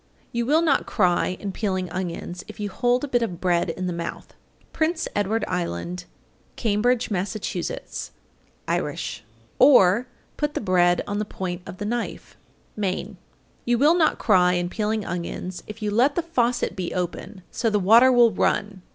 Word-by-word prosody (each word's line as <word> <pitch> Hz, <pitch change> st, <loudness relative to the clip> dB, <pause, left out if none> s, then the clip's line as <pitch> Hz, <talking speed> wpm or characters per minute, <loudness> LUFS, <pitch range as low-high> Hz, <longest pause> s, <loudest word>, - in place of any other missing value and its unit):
862. -, -, -4 dB
You 235 Hz, -, 0 dB
will 310 Hz, +4 st, +4 dB
not 290 Hz, -5 st, +2 dB
cry 180 Hz, -2 st, +1 dB
in 200 Hz, -, -4 dB
peeling 185 Hz, -2 st, -2 dB
onions 180 Hz, 0 st, -5 dB
if -, -, -11 dB
you 205 Hz, -1 st, -3 dB
hold 245 Hz, +5 st, +1 dB
a -, -, -1 dB
bit 245 Hz, -3 st, +1 dB
of 180 Hz, -7 st, -3 dB
bread 175 Hz, -2 st, +1 dB
in 185 Hz, +2 st, -3 dB
the 180 Hz, -, -2 dB
mouth. 170 Hz, 0 st, -6 dB, 0.4 s
Prince 320 Hz, +1 st, 0 dB
Edward 205 Hz, +2 st, 0 dB
Island, 180 Hz, -, -3 dB, 0.5 s
Cambridge, 230 Hz, +2 st, +1 dB
Mass. 190 Hz, +1 st, -1 dB, 1.3 s
(Irish). -, -, -2 dB, 0.4 s
Or, 245 Hz, -4 st, +6 dB, 0.3 s
put 295 Hz, -1 st, -1 dB
the -, -, 0 dB
bread 175 Hz, -3 st, +3 dB
on 205 Hz, 0 st, -3 dB
the -, -, 0 dB
point 185 Hz, -4 st, -5 dB
of 185 Hz, -, -8 dB
the 205 Hz, -, -4 dB
knife. 235 Hz, +2 st, -4 dB, 0.4 s
Maine. 195 Hz, -1 st, -3 dB, 0.5 s
863. -, -, +1 dB
You 240 Hz, -, +4 dB
will 295 Hz, +6 st, +5 dB
not 320 Hz, -3 st, +3 dB
cry 180 Hz, -4 st, +4 dB
in 175 Hz, 0 st, -1 dB
peeling 215 Hz, +1 st, -1 dB
onions 175 Hz, +1 st, -5 dB
if 215 Hz, +1 st, -8 dB
you 210 Hz, -, 0 dB
let 250 Hz, +7 st, +3 dB
the 345 Hz, -, 0 dB
faucet 245 Hz, -7 st, 0 dB
be 185 Hz, -3 st, -4 dB
open 185 Hz, +2 st, -4 dB
so 230 Hz, -, 0 dB
the 210 Hz, -, +2 dB
water 225 Hz, +7 st, +6 dB
will 240 Hz, -2 st, +6 dB
run. 200 Hz, -3 st, 0 dB
205 Hz, 175 wpm, -24 LUFS, 180-240 Hz, 1.3 s, Or